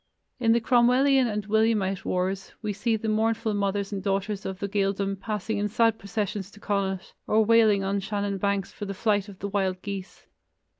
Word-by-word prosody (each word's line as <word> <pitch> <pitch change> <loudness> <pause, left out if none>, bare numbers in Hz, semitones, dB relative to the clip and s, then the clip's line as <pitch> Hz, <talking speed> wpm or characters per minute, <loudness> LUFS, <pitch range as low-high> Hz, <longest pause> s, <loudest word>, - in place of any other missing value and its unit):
In 225 -2 +4
the 235 - +3
Cromwellian 255 +3 +4
and 210 -2 -3
Williamite 215 -3 +1
wars, 185 +1 -2
we 210 -1 -1
see 225 +3 0
the 220 +1 -4
mournful 220 0 +1
mothers 200 0 -1
and 195 - -3
daughters 195 +1 -2
of 190 -1 -5
the 200 - -3
Gaeldom 195 -1 0
passing 210 +1 -3
in 205 - 0
sad 225 +1 +2
procession 205 +1 -2
to 200 +2 -13
Connacht, 195 -2 -2
or 220 0 +3
wailing 220 -3 +5
on 195 +1 0
Shannon 200 0 -2
banks 200 0 0
for 205 - -6
the 195 0 -5
flight 205 -1 +1
of 195 - -11
the 200 - -4
"Wild 190 -2 -1
Geese." 200 -1 -7
205 Hz, 190 wpm, -26 LUFS, 195-220 Hz, -, wailing